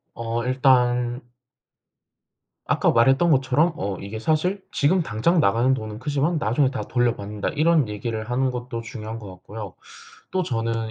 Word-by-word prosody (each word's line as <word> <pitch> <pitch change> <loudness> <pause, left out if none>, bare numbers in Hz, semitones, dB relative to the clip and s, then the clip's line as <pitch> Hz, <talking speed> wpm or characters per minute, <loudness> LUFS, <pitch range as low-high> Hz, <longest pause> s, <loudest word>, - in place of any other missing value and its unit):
어 115 0 -3
일단 125 -1 +2 1.4
아까 - - +2
말했던 135 +8 +4
것처럼 140 +4 +3
어 95 0 -3
이게 100 +3 -6
사실 170 - 0
"지금 170 +5 +2
당장 155 +9 +1
나가는 120 +5 +3
돈은 110 -3 -6
크지만 145 +5 0
나중에 130 +3 +1
다 130 - -4
돌려받는다." 105 -4 -1
이런 155 -4 +2
얘기를 110 +2 -4
하는 130 +1 +1
것도 125 -1 -5
중요한 110 -1 -7
것 100 -4 -9
같고요. 100 +2 -9 0.6
또 185 0 0
저는 115 -4 -2
120 Hz, 310 characters per minute, -23 LUFS, 110-140 Hz, 1.4 s, 말했던